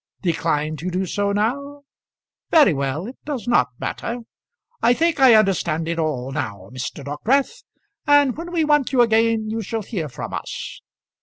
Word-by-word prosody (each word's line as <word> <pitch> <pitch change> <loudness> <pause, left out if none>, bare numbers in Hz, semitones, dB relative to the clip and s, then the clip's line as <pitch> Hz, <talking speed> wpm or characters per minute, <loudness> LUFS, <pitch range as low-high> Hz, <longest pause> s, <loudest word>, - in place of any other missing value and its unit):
Decline 155 -3 0
to 170 +5 -4
do 185 +1 -1
so 200 +2 -1
now? 280 +8 -2 0.7
Very 300 - +6
well; 140 +4 -2
it 250 +4 -9
does 280 -6 -5
not 240 - +4
matter. 240 +1 -4 0.6
I 240 - +4
think 330 0 +1
I 260 -4 +7
understand 170 -6 +2
it 170 0 -2
all 135 -5 -2
now, 110 -9 -5
Mr. 130 +3 -5
Dockwrath; 265 - 0 0.5
and 290 -3 +5
when 340 +2 -7
we 330 -3 +1
want 295 -3 +2
you 255 -3 +4
again, 225 -1 +2
you 225 0 -2
shall 225 +1 -4
hear 180 -8 -4
from 125 - -7
us. - - -6
215 Hz, 165 wpm, -22 LUFS, -, 0.7 s, I